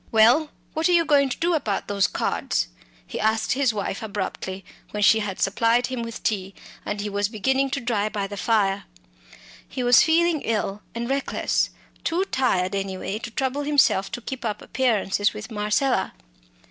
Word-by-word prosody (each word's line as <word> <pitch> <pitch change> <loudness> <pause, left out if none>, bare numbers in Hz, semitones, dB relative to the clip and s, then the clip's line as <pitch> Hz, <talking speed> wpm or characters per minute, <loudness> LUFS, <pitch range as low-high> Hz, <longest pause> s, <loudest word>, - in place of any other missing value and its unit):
"Well, 240 +8 +5 0.2
what 320 +2 +1
are - - +4
you 335 -1 +4
going 280 -3 +4
to 245 - -3
do 345 +1 +1
about 225 -11 -1
those 200 -1 +2
cards?" - - -1 0.4
he - - -6
asked 220 +1 +1
his 265 -2 +2
wife 200 -2 -3
abruptly 195 -2 -4 0.2
when 210 0 -2
she 220 +2 +6
had 205 -3 -4
supplied 230 +4 +2
him 255 -2 -4
with 230 0 -6
tea, 195 -3 -1 0.3
and 205 - -3
he 205 - -2
was 205 0 -1
beginning 265 +5 +1
to 275 - -2
dry 225 -4 0
by 205 -2 -2
the 205 +1 -6
fire. 200 -1 +1 0.8
He 255 - -4
was 245 0 +7
feeling 325 -1 +3
ill 210 -2 -2
and 235 0 -3
reckless; 275 +1 0 0.3
too 350 +4 0
tired 200 - 0
anyway 195 +1 -3
to 235 - -6
trouble 265 +4 -1
himself 285 -9 +3
to 245 - -4
keep 265 +2 -6
up 210 -3 -3
appearances 210 -5 +1
with 215 +2 -8
Marcella. 210 +5 0
225 Hz, 175 wpm, -24 LUFS, 205-265 Hz, 0.8 s, was